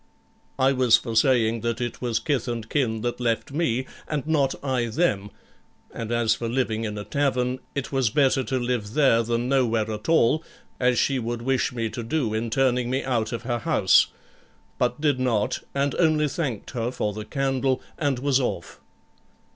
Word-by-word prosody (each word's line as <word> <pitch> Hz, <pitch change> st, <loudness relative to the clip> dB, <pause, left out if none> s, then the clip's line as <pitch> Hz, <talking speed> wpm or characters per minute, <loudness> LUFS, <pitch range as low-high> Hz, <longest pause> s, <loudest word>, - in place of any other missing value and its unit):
I 130 Hz, +1 st, +4 dB
was 125 Hz, -3 st, +5 dB
for 115 Hz, -2 st, -5 dB
saying 115 Hz, -2 st, +3 dB
that 115 Hz, -1 st, -2 dB
it 120 Hz, -2 st, -4 dB
was 120 Hz, -3 st, 0 dB
kith 140 Hz, -6 st, -1 dB
and 115 Hz, -3 st, -4 dB
kin 115 Hz, -5 st, 0 dB
that 120 Hz, +1 st, -2 dB
left 115 Hz, +2 st, -1 dB
me, 130 Hz, -5 st, 0 dB, 0.2 s
and 150 Hz, -2 st, -2 dB
not 145 Hz, -4 st, +1 dB
I 130 Hz, -3 st, 0 dB
them; 110 Hz, -, 0 dB, 0.6 s
and 115 Hz, -1 st, -5 dB
as 120 Hz, -2 st, +2 dB
for 115 Hz, +1 st, -4 dB
living 115 Hz, -3 st, -1 dB
in 105 Hz, -1 st, -4 dB
a 105 Hz, -, -4 dB
tavern, 130 Hz, -1 st, 0 dB, 0.2 s
it 140 Hz, -2 st, -3 dB
was 135 Hz, -4 st, +2 dB
better 135 Hz, +2 st, +2 dB
to 130 Hz, -, -1 dB
live 120 Hz, -4 st, -2 dB
there 135 Hz, -6 st, +4 dB
than 115 Hz, +1 st, -1 dB
nowhere 115 Hz, -5 st, +1 dB
at 105 Hz, +4 st, -5 dB
all, 160 Hz, 0 st, +3 dB, 0.4 s
as 125 Hz, -1 st, +2 dB
she 135 Hz, -2 st, +2 dB
would 120 Hz, 0 st, -4 dB
wish 130 Hz, 0 st, +1 dB
me 115 Hz, -2 st, -2 dB
to 120 Hz, -, -5 dB
do 115 Hz, -1 st, -1 dB
in 115 Hz, +1 st, -1 dB
turning 125 Hz, 0 st, +1 dB
me 130 Hz, +2 st, -1 dB
out 115 Hz, -4 st, -1 dB
of 115 Hz, -1 st, -4 dB
her 120 Hz, -1 st, -1 dB
house; -, -, +4 dB, 0.7 s
but 125 Hz, +1 st, 0 dB
did 145 Hz, -4 st, +1 dB
not, 115 Hz, -5 st, 0 dB, 0.2 s
and 140 Hz, 0 st, +1 dB
only 155 Hz, -3 st, +2 dB
thanked 135 Hz, -, -3 dB
her 120 Hz, -2 st, -2 dB
for 105 Hz, -4 st, -2 dB
the 105 Hz, +1 st, -6 dB
candle, 135 Hz, +1 st, 0 dB, 0.2 s
and 145 Hz, -4 st, +1 dB
was 135 Hz, +1 st, +2 dB
off. 120 Hz, -9 st, -3 dB
125 Hz, 185 wpm, -25 LUFS, 115-135 Hz, 0.7 s, was